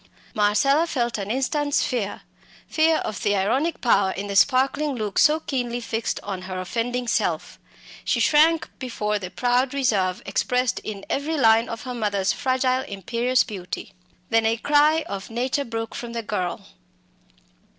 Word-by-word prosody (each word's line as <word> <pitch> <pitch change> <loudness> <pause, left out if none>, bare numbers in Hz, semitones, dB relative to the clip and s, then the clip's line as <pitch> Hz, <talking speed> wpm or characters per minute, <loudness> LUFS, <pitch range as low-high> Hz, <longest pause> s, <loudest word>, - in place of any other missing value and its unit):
Marcella 275 +10 +3
felt 240 -7 -1
an 200 0 -4
instant's 285 +4 0
fear 215 -6 -3 0.4
fear 320 0 +2
of 210 - -4
the 205 0 +1
ironic 255 - 0
power 200 -5 +3
in 195 +1 -4
the 200 -1 -4
sparkling 275 +5 +3
look 210 -4 -2
so 305 +1 +5
keenly 245 -5 -3
fixed 230 -1 -3
on 195 -2 -5
her 185 0 -5
offending 240 +6 -2
self; - - -1 0.4
she - - 0
shrank 320 +2 +4
before 210 -4 -2
the 185 -2 -6
proud 250 +5 +1
reserve 200 -9 +1
expressed 250 +5 0
in 200 -2 -7
every 310 +3 -1
line 225 -2 +4
of 230 -1 -6
her 255 - -5
mother's 205 -4 0
fragile 255 -1 +1
imperious 235 +5 0
beauty. 190 -4 -7 0.4
Then 225 0 +3
a 225 +1 +1
cry 300 +5 +3
of 195 -1 -6
nature 255 +4 -1
broke 225 -1 -4
from 235 -1 -6
the 230 -1 -3
girl. 185 -4 -3
235 Hz, 155 wpm, -23 LUFS, 205-265 Hz, 0.4 s, so